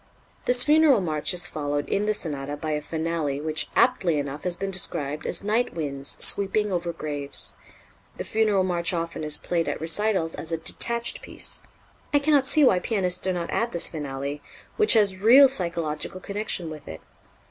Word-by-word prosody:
This 245 0 +6
funeral 300 -4 +5
march 155 -4 -1
is 175 -1 +1
followed 145 -3 -3
in 205 +1 -1
the 215 - +1
sonata 145 -5 -3
by 155 +1 -4
a 150 0 -1
finale 160 -3 -3
which 155 +1 -2
aptly 190 -11 +2
enough 145 +2 -5
has 175 -1 +1
been 195 +1 -4
described 150 -5 -2
as 175 - +2
night 220 +2 0
winds 140 -4 -2
sweeping 200 +1 +1
over 175 -1 -2
graves. 145 -3 -1 0.6
The - - -4
funeral 215 -3 +1
march 175 -1 -1
often 170 -2 -4
is 150 -1 -1
played 170 -2 -2
at - - -4
recitals 165 +1 +1
as 160 - -8
a 165 - 0
detached 235 +8 0
piece. - - -2 0.5
I - - +7
cannot 285 -2 +2
see 305 +2 +4
why 190 -9 +4
pianists 180 -2 -1
do 185 - -1
not 175 -2 -4
add 235 - -1
this 170 - +2
finale, 145 -1 -5 0.3
which 430 -1 +4
has 205 -4 +3
real 245 +8 +7
psychological 170 - -2
connection 200 -4 -3
with 155 -2 -10
it. 80 0 -9
175 Hz, 180 wpm, -24 LUFS, 155-210 Hz, 0.6 s, I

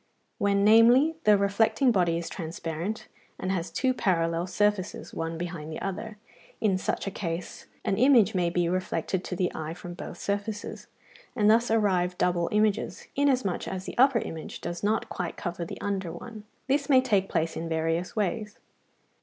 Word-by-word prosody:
When, 200 0 +2
namely, 235 +8 +6
the 210 -1 +6
reflecting 220 +6 +2
body 175 -5 +2
is 170 - -4
transparent, 165 +4 -5 0.3
and 185 - -2
has 180 -2 -2
two 260 -1 +1
parallel 170 -5 0
surfaces, 205 -1 -1
one 165 0 -3
behind 165 -2 -5
the 155 - -5
other: 210 +3 -5 0.4
in 195 -4 +2
such - - -2
a 195 - -3
case, 170 -2 -5 0.2
an 195 - +1
image 245 -4 +5
may 180 -2 +1
be 175 0 +1
reflected 185 +1 -1
to 180 - -4
the 180 0 0
eye 160 +1 -5
from 175 0 -8
both 175 - -8
surfaces, 205 +2 -4 0.5
and 210 0 +4
thus 235 +2 +3
arise 190 -5 +2
double 175 -1 +1
images, 210 -1 0
inasmuch 260 -9 +1
as 190 0 -4
the - - -6
upper 265 -1 +6
image 165 -8 -5
does 175 0 -5
not 215 +2 0
quite - - -4
cover 175 -2 -4
the - - -8
under 195 -4 -2
one: 220 -3 -9 0.2
this 280 +2 0
may 265 -2 +7
take 205 -7 +1
place 165 0 0
in 165 0 -4
various 165 +3 -1
ways. 210 0 -2
195 Hz, 170 wpm, -27 LUFS, 175-220 Hz, 0.5 s, may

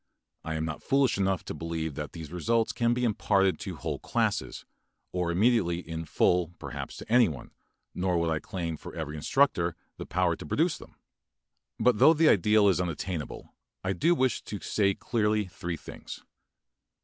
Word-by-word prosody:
I 80 - -3
am 80 0 -1
not 75 -1 -5
foolish 135 -6 +2
enough 95 -2 0
to - - -5
believe 80 -2 -3
that 75 +1 -6
these 80 -3 -8
results 110 +7 +1
can 120 -1 +1
be 125 - -1
imparted 100 -4 +2
to 95 -3 -5
whole 75 -3 -4
classes, - - -1 0.5
or 90 -1 -1
immediately 95 -1 +2
in 80 0 -4
full 90 +2 +1
perhaps - - -7
to - - -9
anyone, 115 - +2 0.4
nor 90 -1 0
would 85 -1 +1
I 80 - 0
claim 85 -1 -4
for - - -10
every 80 -2 -4
instructor 85 - +2 0.2
the - - -7
power 90 -1 +1
to - - -9
produce 160 - +1
them. - - -14 0.8
But 125 -4 +3
though 160 - +7
the 155 0 +5
ideal 105 +2 +4
is 90 -3 +3
unattainable, 85 -2 -4 0.3
I 95 +1 0
do 165 - +3
wish 130 -4 +1
to 105 - -5
say 100 -2 +1
clearly 105 -2 0
three 85 -2 -5
things. - - -10
90 Hz, 175 wpm, -28 LUFS, 80-110 Hz, 0.8 s, though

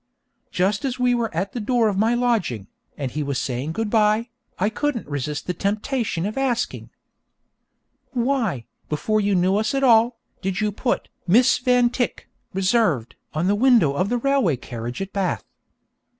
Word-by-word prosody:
Just 195 +3 0
as 260 -2 -2
we 250 -1 +2
were 235 -2 0
at 185 +4 -2
the 245 - -3
door 230 +1 +2
of 205 - 0
my 220 +4 +2
lodging, 225 - 0 0.3
and 135 -4 -3
he 150 - -3
was 140 -2 -2
saying 135 +4 -3
good 220 +2 -2
bye, 220 +1 +3 0.3
I 205 +4 +1
couldn't 280 0 -2
resist 145 +1 -4
the 180 - -2
temptation 205 - -1
of 215 +6 -3
asking: 250 -3 -1 1.2
'Why, 240 - -1 0.2
before 215 +8 0
you 200 -1 +1
knew 185 +2 +3
us 220 +5 0
at 275 - 0
all, 235 -1 +5 0.2
did 190 0 -2
you 210 -1 +1
put 240 +4 -2 0.2
"Miss 240 +8 +5
Van 250 -1 +3
Tyck: 245 -1 -2 0.2
Reserved," 185 - +1 0.2
on 155 +3 0
the 195 - +3
window 225 - +4
of 185 +8 0
the 245 - +1
railway 270 - +2
carriage 120 +5 -5
at 195 - -10
Bath?' 195 -2 -1
210 Hz, 170 wpm, -23 LUFS, 175-240 Hz, 1.2 s, all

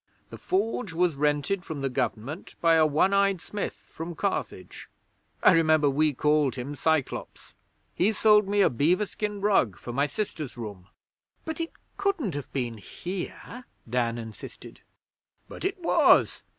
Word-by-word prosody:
The - - -8
Forge 230 - -1
was 175 0 +2
rented 150 +6 0
from 155 -5 -6
the 135 - 0
Government 125 - -3
by 165 -1 +4
a 160 -1 +5
one 155 +6 +2
eyed 200 -2 +3
smith 205 +4 -4 0.2
from 165 +1 -6
Carthage. - - -4 0.5
I - - +8
remember 155 -3 +4
we 150 +2 +2
called 150 0 +2
him 135 +3 -5
Cyclops. 160 -1 -2 0.4
He 200 +5 +2
sold 210 -2 +4
me 205 0 +2
a - - +3
beaver 170 - +2
skin 205 0 -4
rug 160 - +2
for 120 - -7
my 140 +3 +1
sister's 155 - -5
room.' 100 -6 -8 0.6
'But 320 0 -4
it 330 - -4 0.2
couldn't 395 - 0
have 145 -1 -6
been 120 -5 -3
here,' 190 - -7 0.2
Dan 120 0 0
insisted. 115 -2 -10 0.7
'But - - -10
it 390 +2 -1
was! 340 - +4
160 Hz, 150 wpm, -27 LUFS, 135-200 Hz, 0.7 s, I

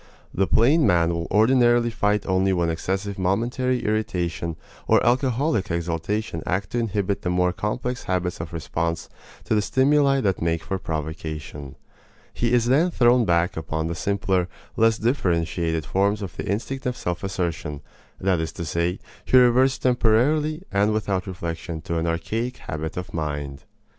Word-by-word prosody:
The 95 0 +1
plain 145 +7 +4
man 85 -1 +3
will 85 0 -3
ordinarily 120 +2 +4
fight 105 -2 0
only 95 0 +2
when 85 -2 +1
excessive 95 +4 -3
momentary 120 +7 0
irritation 90 -6 -1 0.3
or - - +4
alcoholic 125 -2 +1
exaltation 85 +2 -2
act 95 +2 -2
to 120 - 0
inhibit 100 -3 -1
the 90 - -2
more 90 0 +2
complex 120 +6 -3
habits 90 -2 -1
of 80 - -7
response 85 0 -3 0.3
to - - -1
the 105 - +3
stimuli 135 +4 +3
that 95 -5 0
make 85 -1 0
for 95 - -3
provocation. 80 -3 -5 0.6
He 120 -1 0
is 120 -2 +3
then 145 +9 +3
thrown 120 -6 +4
back 85 -1 +2
upon 80 0 -3
the 85 - -2
simpler, 95 -1 0 0.3
less 115 0 +3
differentiated 85 - 0
forms 100 +7 +1
of 95 - -7
the - - -5
instinct 125 +6 -2
of 125 - -2
self 90 +1 -3
assertion; 85 -6 -3 0.4
that 95 -2 +1
is 80 0 -2
to 85 - -5
say, 85 +4 -1 0.3
he 130 - +4
reverts 130 +2 +5
temporarily 135 +7 +2
and 100 +2 +2
without 100 -3 -1
reflection 85 -2 -5
to 85 -2 -2
an 80 - -1
archaic 110 +10 -2
habit 80 +2 -5
of 90 - -5
mind. 75 -3 -4
95 Hz, 160 wpm, -24 LUFS, 85-120 Hz, 0.6 s, reverts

